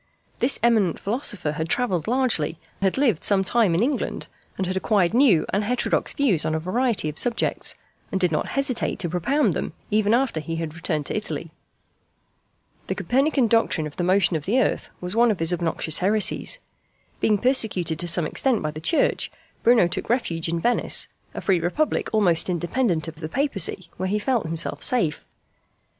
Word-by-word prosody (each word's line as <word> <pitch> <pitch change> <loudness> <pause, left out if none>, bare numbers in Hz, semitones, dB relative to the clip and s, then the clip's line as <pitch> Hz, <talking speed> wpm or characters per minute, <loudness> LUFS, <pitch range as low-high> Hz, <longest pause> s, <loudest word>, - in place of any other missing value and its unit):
This 250 +3 +2
eminent 220 -8 +3
philosopher 205 - -1
had 160 +2 -4
travelled 185 -10 0
largely, 235 - +1 0.2
had 190 +3 +1
lived 245 - +2
some 195 -2 +3
time 200 -3 +2
in 185 - +2
England, 270 0 -2 0.3
had 185 0 -2
acquired 190 -1 +1
new 235 - +4
and 200 +2 +1
heterodox 245 +4 0
views 240 - +1
on 155 - -1
a - - 0
variety 225 +2 0
of 150 0 -3
subjects, 240 -2 -1 0.4
and 190 - -1
did 180 -3 +2
not 155 - -1
hesitate 275 -3 0
to 175 - -1
propound 245 - +1
them - - -4 0.2
even 215 +1 +3
after 250 -9 0
he 165 +2 -5
had 165 -2 -4
returned 160 -2 -1
to - - -4
Italy. 215 - -4 1.4
The - - -2
Copernican 270 +1 +1
doctrine 225 -8 +1
of 150 - -8
the 175 - -1
motion 185 0 +3
of 150 -2 -3
the 235 +7 +2
earth - - 0
was 180 +3 -3
one 235 +1 +4
of 210 - 0
his 165 +1 +1
obnoxious 165 -2 0
heresies. 210 - +1 0.6
Being 210 -1 +2
persecuted 200 - 0
to 175 - 0
some 170 -1 +1
extent 240 - 0
by 155 - -1
the 155 +1 -8
Church, 320 - +1 0.3
Bruno 230 -6 +5
took 175 - -4
refuge 170 -9 0
in 170 0 -1
Venice 240 +8 +1 0.3
a - - -4
free 190 -3 +2
republic 180 - -1
almost 185 -6 +3
independent 175 -1 0
of 160 -1 -8
the 155 -1 -6
Papacy 195 - -1
where 185 +1 -2
he 210 - +1
felt 225 -4 0
himself 165 0 -2
safe. 175 -12 0
190 Hz, 180 wpm, -23 LUFS, 165-240 Hz, 1.4 s, Bruno